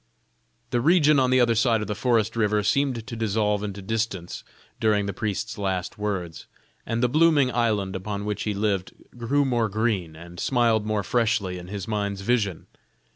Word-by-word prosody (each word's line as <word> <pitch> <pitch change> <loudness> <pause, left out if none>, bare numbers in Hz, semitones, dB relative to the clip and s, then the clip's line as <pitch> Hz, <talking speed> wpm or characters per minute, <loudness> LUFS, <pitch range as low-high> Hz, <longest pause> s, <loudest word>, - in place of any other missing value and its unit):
The 120 -2 +1
region 150 -1 +5
on 130 -1 +3
the 130 0 +4
other 120 -2 +4
side 115 -1 +2
of - - -2
the 105 - -3
forest 115 0 +1
river 105 -2 +1
seemed 130 0 0
to 115 - -7
dissolve 105 -2 0
into 100 -1 -5
distance 110 -4 -3 0.4
during 105 -2 +2
the 100 - -3
priest's 105 +2 -3
last 95 -1 -3
words: 95 -6 -4 0.4
and 115 +1 -1
the - - +5
blooming 150 -1 +4
island 105 -5 0
upon 100 +2 -4
which 105 -1 -3
he 105 -1 -2
lived 100 -2 -1 0.2
grew 135 +5 +1
more 120 -4 +1
green, 100 -6 -1
and 85 +2 -11
smiled 115 -4 +2
more 105 -1 0
freshly 105 -3 0
in 90 - -10
his 100 -1 -6
mind's 100 -2 -2
vision. 100 -5 0
105 Hz, 180 wpm, -25 LUFS, 100-120 Hz, 0.4 s, region